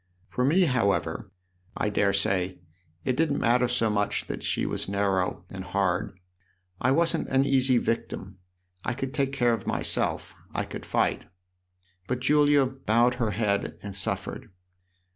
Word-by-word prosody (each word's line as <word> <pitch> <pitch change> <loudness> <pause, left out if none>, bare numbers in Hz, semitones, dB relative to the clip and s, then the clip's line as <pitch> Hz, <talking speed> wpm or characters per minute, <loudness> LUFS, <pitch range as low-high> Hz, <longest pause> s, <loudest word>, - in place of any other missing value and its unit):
For 125 - -2
me, 155 +9 +4
however, 100 - 0 0.5
I 105 - 0
daresay, 95 -2 +1 0.5
it 130 - +1
didn't 150 0 +1
matter 125 +1 +3
so 115 -3 +1
much 105 0 0
that - - -5
she - - -1
was - - -2
narrow 95 -3 0
and 95 0 -7
hard: 95 +1 -1 0.6
I 130 - +2
wasn't 165 +5 +2
an 135 +1 +2
easy 130 -2 +4
victim 100 -5 -3 0.4
I 120 - -2
could 135 +1 -4
take 140 -2 0
care 120 -3 +2
of 110 -4 -4
myself, - - 0 0.2
I - - 0
could - - -8
fight. - - 0 0.8
But 125 0 -1
Julia 145 +1 +4
bowed 125 -2 +2
her 115 - +2
head 105 -1 -1
and 100 -1 -6
suffered. 100 - -3
115 Hz, 145 wpm, -27 LUFS, 100-135 Hz, 0.8 s, me